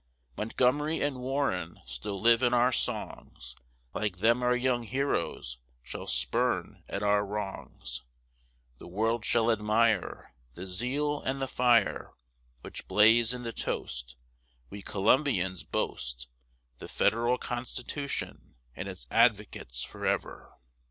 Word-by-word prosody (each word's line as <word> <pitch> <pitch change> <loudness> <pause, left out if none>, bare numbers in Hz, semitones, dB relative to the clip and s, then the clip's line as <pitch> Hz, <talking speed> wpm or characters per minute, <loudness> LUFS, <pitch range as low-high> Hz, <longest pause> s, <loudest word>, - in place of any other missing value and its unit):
Montgomery 130 - +1
and 140 -3 -1
Warren 125 - -1
still 65 +11 -5
live 115 +2 +5
in 125 -1 +3
our 120 +1 +4
songs; 60 - -3 0.4
Like 105 -4 -2
them 115 +5 +3
our 125 0 +3
young 125 -1 +1
heroes 115 - -2 0.2
shall - - -7
spurn - - 0
at 100 - -3
our 105 0 +3
wrongs: 100 -1 -5 0.8
The - - -10
world 110 +5 0
shall 115 0 +3
admire 110 - +1 0.2
The 90 - -7
zeal 135 +10 -1
and 135 +1 -2
the 135 - -1
fire, 120 -5 +2 0.5
Which - - -9
blaze 115 +2 +6
in 125 -1 -4
the 115 -1 -4
toast 60 - -4 0.6
We 100 - -7
Columbians 95 - +1
boast 60 0 -3 0.5
The - - -8
Federal 120 +2 +2
Constitution 125 +4 -4 0.2
and - - -5
its - - -8
advocates 105 - +2
forever. - - -3
115 Hz, 120 wpm, -29 LUFS, 95-125 Hz, 0.8 s, blaze